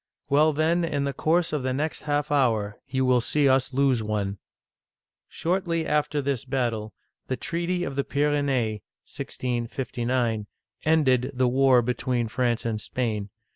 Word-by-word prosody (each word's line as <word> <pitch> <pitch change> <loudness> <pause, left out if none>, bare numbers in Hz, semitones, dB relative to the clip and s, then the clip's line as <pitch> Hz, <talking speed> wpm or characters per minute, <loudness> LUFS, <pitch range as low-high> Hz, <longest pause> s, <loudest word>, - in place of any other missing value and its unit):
"Well, 150 +2 +5
then, 160 +3 +1
in 150 -4 -1
the, 140 0 -1
course 165 +2 +1
of 150 - 0
the 130 0 -1
next 150 +4 -2
half 145 0 0
hour, 110 -7 +1
you 130 0 0
will 125 -1 +4
see 145 +4 +2
us 130 0 +3
lose 135 -3 +2
one! 105 -2 -2 0.5
" - - -68
Shortly 170 -2 -1
after 150 -1 0
this 135 -4 -1
battle, 120 -6 -2 0.3
the 130 - -2
treaty 175 +1 -2
of 140 - -4
the 140 - +1
Pyrenees 140 -8 0 0.2
(1659) 120 -2 -2 0.4
ended 135 -6 +3
the 130 0 +2
war 130 -1 +4
between 125 0 -1
France 120 0 0
and 110 -2 -2
Spain. 110 -5 -2
130 Hz, 150 wpm, -26 LUFS, 120-145 Hz, 0.5 s, Well